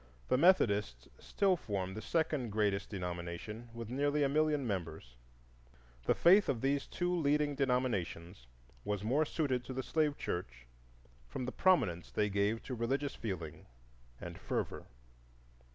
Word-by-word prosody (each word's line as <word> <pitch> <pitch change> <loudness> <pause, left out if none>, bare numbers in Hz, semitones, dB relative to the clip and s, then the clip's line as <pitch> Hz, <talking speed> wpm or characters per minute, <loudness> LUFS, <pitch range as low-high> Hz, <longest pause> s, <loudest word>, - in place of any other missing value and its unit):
The - - +4
Methodists 105 - +3
still 195 -2 +2
form 95 - -3
the 110 - -6
second 155 -2 0
greatest 100 -2 0
denomination, 90 +4 -5
with 115 -1 -7
nearly 145 +2 +1
a 140 - +2
million 150 -1 +2
members. 80 - -4 0.9
The - - +3
faith 190 +2 +6
of 130 -4 +1
these 140 +1 0
two 180 0 -1
leading 150 -2 +2
denominations 110 - -1 0.4
was 105 -1 -2
more 135 +8 +2
suited 140 -5 -1
to 130 - -6
the 130 +1 -3
slave 150 -1 +1
church - - -4 0.6
from 125 - -4
the 130 - -3
prominence 115 - +2
they 105 -1 0
gave 100 +3 0
to 130 - -5
religious 135 +4 -1
feeling 85 -8 -6 0.5
and - - -8
fervor. - - -3
120 Hz, 140 wpm, -34 LUFS, 95-145 Hz, 0.9 s, faith